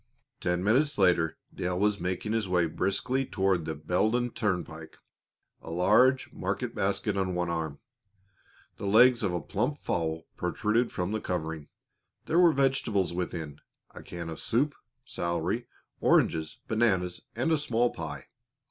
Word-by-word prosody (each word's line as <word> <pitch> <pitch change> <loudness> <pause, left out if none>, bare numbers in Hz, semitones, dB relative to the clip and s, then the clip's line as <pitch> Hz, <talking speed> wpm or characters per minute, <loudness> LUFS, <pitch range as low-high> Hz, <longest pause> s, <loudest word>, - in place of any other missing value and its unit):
Ten 90 +1 0
minutes 135 +9 +2
later 85 -4 +3 0.2
Dale 90 0 -2
was 105 0 +2
making 90 +4 -2
his 110 -3 0
way 90 -1 +3
briskly 125 +10 0
toward 95 -8 0
the 80 - -3
Beldon 110 +10 0
Turnpike, 85 -7 -3 0.6
a - - -10
large 110 +10 +3
market - - -3
basket - - 0
on 95 -2 -1
one 90 -1 -1
arm. 80 -3 -3 1.0
The 100 - -4
legs 120 +4 +6
of 100 -4 0
a 90 - -1
plump 120 - -2
fowl 80 -1 -1
protruded 110 +6 0
from 90 +1 -2
the 110 0 -2
covering; 80 -4 -3 0.6
there 165 - +2
were 175 -2 +7
vegetables 130 - +1
within, 80 -4 -4 0.3
a - - -10
can 85 -1 -7
of 80 - -7
soup, 140 +6 +1 0.3
celery, 85 +7 -2 0.3
oranges, 80 -1 +2
bananas, 95 -6 +1
and 165 - 0
a 160 - +3
small 120 -4 +1
pie. 75 -5 -6
95 Hz, 145 wpm, -29 LUFS, 85-115 Hz, 1.0 s, were